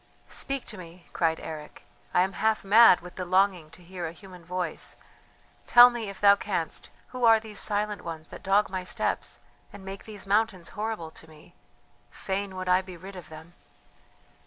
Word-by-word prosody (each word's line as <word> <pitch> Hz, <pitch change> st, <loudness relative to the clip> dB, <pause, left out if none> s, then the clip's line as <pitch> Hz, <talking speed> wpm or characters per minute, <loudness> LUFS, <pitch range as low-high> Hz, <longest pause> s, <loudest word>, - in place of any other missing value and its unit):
"Speak 275 Hz, -1 st, -2 dB
to 215 Hz, -, -8 dB
me," 170 Hz, 0 st, -12 dB
cried 160 Hz, -2 st, +1 dB
Eric. 155 Hz, -1 st, -9 dB, 0.3 s
"I 180 Hz, -, +4 dB
am 190 Hz, +1 st, -2 dB
half 220 Hz, +1 st, 0 dB
mad 210 Hz, -1 st, +7 dB
with 180 Hz, 0 st, -12 dB
the 185 Hz, -, -3 dB
longing 185 Hz, -3 st, +2 dB
to 165 Hz, +3 st, -17 dB
hear 175 Hz, -1 st, -6 dB
a -, -, -6 dB
human 180 Hz, -1 st, -14 dB
voice. 180 Hz, -1 st, -4 dB, 0.7 s
Tell 245 Hz, +1 st, +9 dB
me, 230 Hz, -4 st, -4 dB
if 200 Hz, -, -9 dB
thou 200 Hz, 0 st, +7 dB
canst, 190 Hz, -5 st, -3 dB, 0.2 s
who 255 Hz, -1 st, -6 dB
are 225 Hz, -1 st, +7 dB
these 215 Hz, -2 st, -7 dB
silent 210 Hz, -1 st, 0 dB
ones 160 Hz, -1 st, -7 dB
that -, -, -10 dB
dog 195 Hz, +2 st, +3 dB
my 185 Hz, -1 st, -3 dB
steps, 180 Hz, -, -2 dB, 0.3 s
and 190 Hz, -, -12 dB
make 195 Hz, 0 st, -8 dB
these 210 Hz, -3 st, -9 dB
mountains 200 Hz, -3 st, 0 dB
horrible 215 Hz, -7 st, -4 dB
to 160 Hz, -, -13 dB
me? 155 Hz, +2 st, -17 dB, 0.6 s
Fain 195 Hz, 0 st, -4 dB
would 185 Hz, 0 st, -5 dB
I 180 Hz, +1 st, +4 dB
be 185 Hz, -2 st, -11 dB
rid 190 Hz, +3 st, -10 dB
of 180 Hz, -4 st, -10 dB
them!" 160 Hz, +2 st, -12 dB
190 Hz, 185 wpm, -27 LUFS, 175-210 Hz, 0.7 s, Tell